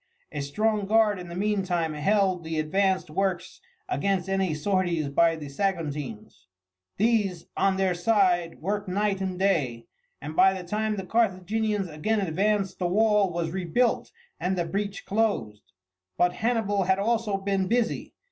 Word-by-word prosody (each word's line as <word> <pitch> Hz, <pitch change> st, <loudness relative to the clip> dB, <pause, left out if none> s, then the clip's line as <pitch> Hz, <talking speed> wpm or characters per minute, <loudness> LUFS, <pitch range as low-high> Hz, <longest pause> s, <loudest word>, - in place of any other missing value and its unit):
A 150 Hz, -, -4 dB
strong 210 Hz, +8 st, 0 dB
guard 215 Hz, -2 st, +3 dB
in 175 Hz, -1 st, -8 dB
the 170 Hz, -, -7 dB
meantime 185 Hz, -5 st, 0 dB
held 185 Hz, +3 st, +1 dB
the 160 Hz, 0 st, -4 dB
advanced 185 Hz, +2 st, +1 dB
works 185 Hz, 0 st, -2 dB, 0.3 s
against 195 Hz, -, 0 dB
any 195 Hz, -2 st, 0 dB
sorties 175 Hz, -1 st, 0 dB
of 140 Hz, -, -6 dB
the 165 Hz, -3 st, +2 dB
Saguntines. 145 Hz, -, -4 dB, 0.5 s
These, 205 Hz, -5 st, +1 dB
on 195 Hz, -1 st, +2 dB
their 190 Hz, -1 st, +2 dB
side, 175 Hz, -3 st, +2 dB
worked 205 Hz, +4 st, -2 dB
night 195 Hz, +1 st, 0 dB
and 185 Hz, -1 st, -2 dB
day, 145 Hz, -12 st, 0 dB, 0.3 s
and 150 Hz, +3 st, -7 dB
by 190 Hz, +2 st, +4 dB
the 180 Hz, -, -9 dB
time 215 Hz, +2 st, -1 dB
the 190 Hz, -2 st, -5 dB
Carthaginians 210 Hz, -1 st, 0 dB
again 175 Hz, +8 st, -1 dB
advanced 195 Hz, +2 st, 0 dB
the 180 Hz, -, 0 dB
wall 210 Hz, 0 st, +3 dB
was 170 Hz, -1 st, -2 dB
rebuilt 190 Hz, +7 st, 0 dB, 0.3 s
and 185 Hz, +1 st, -1 dB
the 175 Hz, -, 0 dB
breach 200 Hz, +3 st, -3 dB
closed. 195 Hz, -, -1 dB, 0.5 s
But 175 Hz, 0 st, +3 dB
Hannibal 220 Hz, -4 st, 0 dB
had 190 Hz, +1 st, +3 dB
also 220 Hz, -1 st, 0 dB
been 195 Hz, -1 st, -1 dB
busy. 235 Hz, +1 st, -1 dB
190 Hz, 150 wpm, -26 LUFS, 170-210 Hz, 0.5 s, by